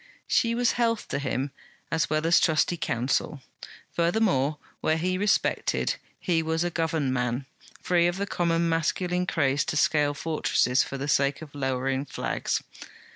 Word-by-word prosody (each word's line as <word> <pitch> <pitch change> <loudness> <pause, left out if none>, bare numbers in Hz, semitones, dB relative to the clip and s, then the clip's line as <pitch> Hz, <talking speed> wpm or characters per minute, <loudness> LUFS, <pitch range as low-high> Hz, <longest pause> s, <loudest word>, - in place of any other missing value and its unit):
She 230 -1 +2
was 245 0 +2
health 230 -2 0
to - - -1
him, 135 0 -2 0.4
as 165 -1 +1
well 155 +1 0
as 170 +2 +5
trusty 160 +1 +2
counsel. 135 0 -1 0.5
Furthermore, 170 -5 +1 0.2
where 155 - +1
he 180 +3 0
respected, 200 +2 +1 0.2
he 170 -3 +1
was 160 +1 0
a 175 - -1
governed 160 -5 0
man, 125 +1 -1 0.4
free 175 -1 +3
of 175 +1 -1
the 200 - -1
common 170 -3 0
masculine 180 +2 0
craze 140 -4 +1
to - - -2
scale 145 -1 +2
fortresses 145 -5 +1
for 140 - -4
the 135 +2 -4
sake 140 +1 +1
of 145 - -12
lowering 135 0 -1
flags. - - -2
160 Hz, 155 wpm, -26 LUFS, 140-175 Hz, 0.5 s, as